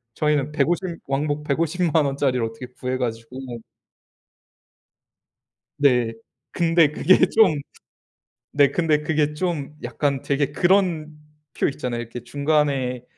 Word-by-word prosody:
저희는 150 -1 0
150 170 +4 -1
왕복 145 +2 -1
1,500,000 160 +1 +1
원짜리를 135 -3 0
어떻게 115 +3 -7
구해 125 +1 -4
가지고. 115 0 -4 2.4
네. 125 -5 +3 0.4
근데 165 -3 +3
그게 185 +4 +4
좀 210 -8 +4 1.0
네. 140 -1 +4
근데 155 -3 +1
그게 150 -1 0
좀 150 -3 -3
약간 135 +3 -1
되게 140 0 0
그런 170 -3 +1 0.4
표 - - 0
있잖아요. 125 -3 -3
이렇게 120 +1 -8
중간에 140 -2 0
145 Hz, 210 characters per minute, -23 LUFS, 130-160 Hz, 2.4 s, 그게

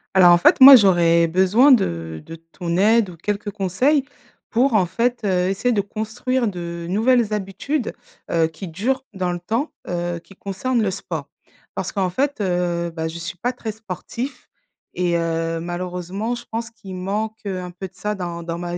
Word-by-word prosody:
Alors 180 -2 +8
en - - +6
fait - - +5
moi, 270 +1 +12
j'aurais 170 -5 +5
besoin 190 - +4
de 85 - +1
de - - -9
ton 170 +1 -5
aide, 215 0 +3
ou - - -12
quelques 205 +4 -3
conseils 215 - +1 0.5
pour 250 +3 +2
en 190 -5 +3
fait, 235 +7 -1
heu, 185 -2 +1
essayer 215 +6 0
de 210 -4 +2
construire 225 +5 -2
de 170 -3 -5
nouvelles 225 +3 +2
habitudes, 210 +7 -2 0.4
heu, 165 -1 +3
qui 160 +4 -9
durent 250 +11 -2
dans 185 -2 -2
le 175 - -3
temps, 230 - -2 0.2
heu, 175 0 -2
qui 185 - -18
concernent 225 +6 -2
le 210 - +1
sport. 190 +1 -5 0.5
Parce - - -3
qu'en 190 -3 0
fait, 275 +5 -1
heu, 175 -2 0
bah, 160 -1 -4
je 165 +1 -6
suis 170 +1 -6
pas 245 +8 -2
très 230 -3 -5
sportif 220 +5 -7 0.5
et 175 -1 0
heu, 165 0 -1
malheureusement 180 +5 -4
je 240 0 -7
pense 230 0 -4
qu'il 195 -5 -10
manque, 210 +4 -3
heu, 190 -2 -3
un 180 0 -6
peu 180 +2 -7
de 185 - -25
ça 210 +2 -3
dans 175 -3 -5
dans 170 0 -4
ma 175 0 -4
190 Hz, 190 wpm, -21 LUFS, 175-225 Hz, 0.5 s, moi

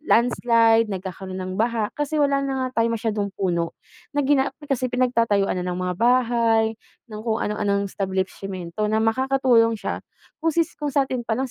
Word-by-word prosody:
ng 305 - -23
landslide, 230 -1 +4
nagkakaroon 190 -1 -6
ng 185 +1 -5
baha. 225 -2 0
Kasi 295 +1 -2
wala 280 -1 +2
na 265 -2 -2
nga 255 - -5
tayong 230 0 +2
masyadong 215 -3 -1
puno 170 -3 -1 0.4
na 290 - +2
gina 275 -1 +3 0.3
kasi 255 -1 +1
pinagtatayuan 230 -6 +1
na 180 - -3
ng 180 - -2
mga 180 0 -2
bahay, 230 -2 +2 0.3
ng 210 0 -6
kung 225 0 0
ano-anong 200 -2 -1
establishimento 190 0 -3
na 220 +1 +1
makakatulong 245 -1 +3
siya 210 - -4 0.4
kung 325 -1 0 0.2
kung 295 -1 -2
satin 260 -4 0
palang 250 +3 -1
225 Hz, 160 wpm, -23 LUFS, 200-255 Hz, 0.4 s, landslide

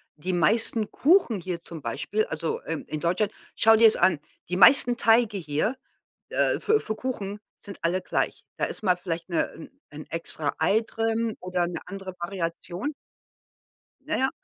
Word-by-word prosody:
die 180 +5 -3
meisten 215 +5 +1
Kuchen 280 - +3
hier 170 -1 -5
zum 165 -3 -8
Beispiel 140 - -1
also, 160 +1 -3
ähm, 160 -2 -4
in 155 - -4
Deutschland 185 +6 0 0.2
schau 225 +1 +6
dir 225 0 +7
es - - +4
an, 175 -4 +3 0.3
die 180 - -1
meisten 240 +5 +7
Teige 225 -3 +3
hier, 155 - -1 0.5
äh, - - +1
für 435 +1 +3
für 220 - -4
Kuchen 210 -6 -4 0.2
sind 200 -2 -9
alle 180 +3 +1
gleich. - - -2
Da - - +1
ist - - -6
mal 180 -3 +2
vielleicht 175 -1 -4
'ne 170 - +2
'n 160 - -11 0.2
'n 150 +1 -8
extra-Ei 165 +5 0
drin 225 0 -1
oder 180 -1 -1
'ne 175 - -4
andere 195 0 -7
Variation. 175 - -4 1.1
Na 310 +3 -3
ja. 265 +1 +2
190 Hz, 165 wpm, -26 LUFS, 170-225 Hz, 1.1 s, dir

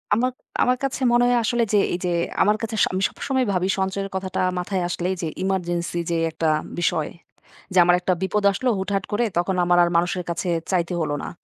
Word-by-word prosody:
আমাক 250 +3 0 0.3
আমার 250 0 +2
কাছে 270 0 -2
মনে 240 0 +4
হয়, 245 0 +3
আসলে 235 +1 +1
যে - - +5 0.2
এইযে, 180 0 -2 0.3
আমার 210 +1 +4
কাছে 225 -1 -3
স - - +6
আমি 185 - -1
সবসময় 260 -2 -1
ভাবি 185 0 +1
সঞ্চয়ের 195 +1 -2
কথাটা 190 -1 -3 0.2
মাথায় 185 +1 -2
আসলেই 180 +2 -1
যে, 165 - -2 0.2
ইমার্জেন্সি 175 -2 -1
যে 170 - +1
একটা 160 0 0 0.3
বিষয়। 160 -3 0 0.6
যে - - 0
আমার 175 +1 +5
একটা 185 +1 +1
বিপদ 195 +2 0
আসলো 250 +6 -1
হুটহাট 195 0 -1
করে, 220 +3 +1
তখন 175 +2 +1
আমার 175 0 +3
আর 170 - +2
মানুষের 180 +1 0
কাছে 175 +1 -2 0.2
চাইতে 180 -1 0
হলো 150 -2 -1
না। - - -4
190 Hz, 200 wpm, -23 LUFS, 175-210 Hz, 0.6 s, স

